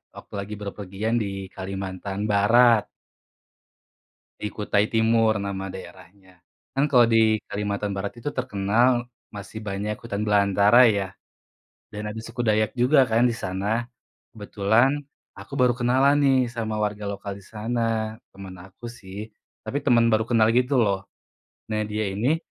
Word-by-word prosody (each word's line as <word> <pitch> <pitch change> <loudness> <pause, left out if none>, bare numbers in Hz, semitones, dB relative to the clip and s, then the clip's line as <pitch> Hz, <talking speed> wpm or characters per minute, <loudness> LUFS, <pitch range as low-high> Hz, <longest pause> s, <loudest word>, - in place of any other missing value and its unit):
waktu - - -13
lagi 100 +2 -6
berpergian 100 +2 -3
di 95 -1 -5
Kalimantan 95 +1 -5
Barat. 115 +2 +5 1.6
Di 105 - -3
Kutai 105 0 0
Timur 110 -1 +3
nama 100 -1 -4
daerahnya. 95 -1 -13 0.3
Kan 140 +2 +1
kalau 120 -4 +6
di 110 -1 +3
Kalimantan 100 0 -3
Barat 100 +4 -5
itu 135 +5 -5
terkenal 120 +1 +1 0.2
masih 105 +1 -8
banyak 105 +1 -3
hutan 110 -2 -3
belantara 105 +4 +5
ya, 100 -2 -1 0.8
dan 105 0 -5
ada 110 - -7
suku 115 +2 -5
Dayak 110 0 +1
juga 130 +2 +4
kan 115 +1 +2
di 125 - +3
sana. 105 +2 -2 0.5
Kebetulan 110 +4 +2 0.4
aku 140 - -10
baru 125 -2 +4
kenalan 130 +4 +3
nih 135 -2 +4
sama 110 -2 -3
warga 105 -1 -2
lokal 100 0 -6
di - - -18
sana, 110 +1 -2 0.2
teman 95 -1 -9
aku 115 +5 -10
sih, 105 -2 -9 0.3
tapi 145 - -3
teman 115 -4 +3
baru 110 +1 +1
kenal 115 -2 +3
gitu 125 +3 +2
loh. 100 -5 +1 0.7
Nah 110 - 0
dia 105 0 -2
ini 125 +11 +1
110 Hz, 140 wpm, -24 LUFS, 100-120 Hz, 1.6 s, kalau